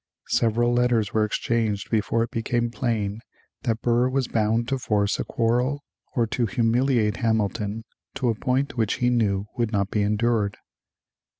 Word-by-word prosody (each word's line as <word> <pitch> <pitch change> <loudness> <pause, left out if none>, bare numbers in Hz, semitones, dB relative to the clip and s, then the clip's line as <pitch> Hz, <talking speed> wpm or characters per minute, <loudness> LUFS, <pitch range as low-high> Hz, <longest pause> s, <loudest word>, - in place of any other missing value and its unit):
Several 120 +1 +2
letters 120 -4 +2
were 110 - +3
exchanged 105 -1 -1
before 115 +1 +1
it 115 - -5
became 120 +1 -1
plain 110 -4 -2 0.4
that 115 -2 -2
Burr 120 +1 +3
was 130 -1 0
bound 115 +1 +1
to 135 -1 0
force 105 -4 0
a - - 0
quarrel 125 +5 0 0.3
or 120 - +3
to 115 +1 -1
humiliate 115 0 +1
Hamilton 110 -2 -1 0.3
to 125 -3 0
a - - +2
point 130 +5 -1
which 110 -3 +1
he 125 0 +1
knew 100 -5 +1
would 115 -2 0
not 100 -2 0
be 105 - +1
endured. 105 0 +1
115 Hz, 160 wpm, -24 LUFS, 105-120 Hz, 0.4 s, were